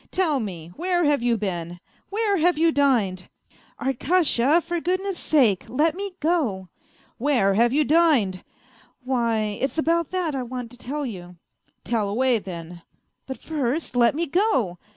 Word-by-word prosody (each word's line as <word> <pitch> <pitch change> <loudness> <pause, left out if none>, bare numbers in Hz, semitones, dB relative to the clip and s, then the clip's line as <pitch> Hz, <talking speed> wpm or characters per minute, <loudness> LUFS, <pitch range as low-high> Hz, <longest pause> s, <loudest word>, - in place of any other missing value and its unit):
Tell 330 -7 +1
me, 175 -8 -6
where 350 +1 0
have 290 -4 +2
you 235 -1 +1
been? 175 -4 -4 0.3
Where 410 -1 0
have 345 0 +2
you 330 +1 +3
dined? 230 - +1 0.2
" - - -29
" - - -33
Arkasha, 285 +2 +2
for 345 -1 -3
goodness 370 +2 -2
sake, 235 - +2
let 305 +6 +1
me 395 +1 -6
go! 265 - -1
" - - -33
" - - -34
Where 240 -7 +2
have 235 +4 +3
you 300 +3 +3
dined? 290 - +2 0.2
" - - -29
" - - -38
Why, 230 -5 0
it's 270 +4 -2
about 330 0 +1
that 360 -5 -2
I 270 - -2
want 245 -1 -6
to 245 - -12
tell 290 +4 -4
you." 180 -7 -8 0.2
" - - -44
TeU 235 - 0
away, 245 +2 +2
then." 175 -3 -9 0.2
" - - -50
But 265 - -5
first 295 -2 -3
let 240 +1 +4
me 335 +2 0
go." 275 - 0
265 Hz, 185 wpm, -24 LUFS, 215-330 Hz, 0.3 s, let